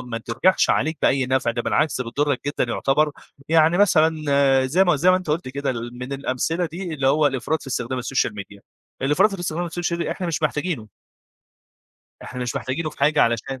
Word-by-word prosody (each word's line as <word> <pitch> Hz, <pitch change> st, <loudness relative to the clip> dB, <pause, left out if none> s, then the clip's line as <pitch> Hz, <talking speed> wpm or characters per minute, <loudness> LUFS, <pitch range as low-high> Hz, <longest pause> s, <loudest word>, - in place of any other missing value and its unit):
ما 120 Hz, -2 st, -5 dB
ترجعش 130 Hz, +12 st, +1 dB
عليك 160 Hz, 0 st, 0 dB
بأي 135 Hz, -1 st, +2 dB
نفع، 130 Hz, -2 st, +1 dB
ده 120 Hz, 0 st, -3 dB
بالعكس 155 Hz, -4 st, 0 dB
بتضّرك 140 Hz, +3 st, -1 dB
جدًا 145 Hz, -, 0 dB
يُعتبر، 150 Hz, +3 st, +1 dB, 0.4 s
يعني 165 Hz, +2 st, +4 dB
مثلًا 165 Hz, -6 st, +4 dB, 0.6 s
زي 175 Hz, +9 st, +3 dB
ما 175 Hz, -4 st, +3 dB
زي 175 Hz, +6 st, +4 dB
ما 185 Hz, -, +4 dB
أنت 185 Hz, -4 st, -4 dB
قُلت 155 Hz, -2 st, -1 dB
كده 140 Hz, +1 st, -2 dB
من 120 Hz, +2 st, -6 dB
الأمثلة 140 Hz, +6 st, -1 dB
دي، 170 Hz, +1 st, -6 dB
اللي 135 Hz, -3 st, -1 dB
هو 150 Hz, +2 st, +3 dB
الإفراط 140 Hz, +3 st, -1 dB
في -, -, -13 dB
استخدام 125 Hz, -1 st, -3 dB
السوشيال 125 Hz, -3 st, -1 dB
ميديا. 100 Hz, 0 st, -9 dB, 0.4 s
الإفراط 150 Hz, +9 st, +3 dB
في 190 Hz, -, -7 dB
استخدام 175 Hz, 0 st, -2 dB
السوشيال 175 Hz, 0 st, -3 dB
ميديا 165 Hz, -1 st, -2 dB
إحنا 180 Hz, -, -5 dB
مش 165 Hz, -1 st, -2 dB
محتاجينُه. 150 Hz, -6 st, -2 dB, 1.3 s
إحنا 125 Hz, 0 st, -6 dB
مش 120 Hz, -, -3 dB
محاجتينه 155 Hz, +5 st, -3 dB
في -, -, -18 dB
حاجة 150 Hz, +2 st, +3 dB
علشان 120 Hz, +3 st, -1 dB
145 Hz, 190 wpm, -22 LUFS, 130-165 Hz, 1.3 s, يعني